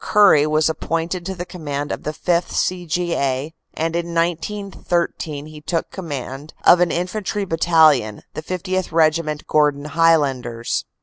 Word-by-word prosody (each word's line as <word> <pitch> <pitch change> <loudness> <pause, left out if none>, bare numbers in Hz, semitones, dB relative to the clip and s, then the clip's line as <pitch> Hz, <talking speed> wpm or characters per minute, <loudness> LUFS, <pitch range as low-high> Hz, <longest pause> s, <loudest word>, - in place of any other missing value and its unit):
Currie 195 -8 +5
was 155 0 +2
appointed 165 +2 -2
to 190 - -4
the 175 0 -5
command 145 -5 -5
of - - -4
the 150 - -3
5th. 175 +2 0
C. 180 -1 -1
G. 175 +2 -1
A., 140 +3 -1 0.2
and 165 +1 -1
in 170 0 -3
1913 170 -3 -2
he 155 -1 -11
took 165 +2 -2
command 145 -4 -6
of 175 - +8
an 180 -1 +3
infantry 195 +4 -2
battalion, 160 - +3
the - - -5
50th. 185 +2 -3
Regiment, 155 -1 +1
Gordon 150 -1 +2
Highlanders. 140 -7 +1
165 Hz, 145 wpm, -20 LUFS, 150-175 Hz, 0.2 s, of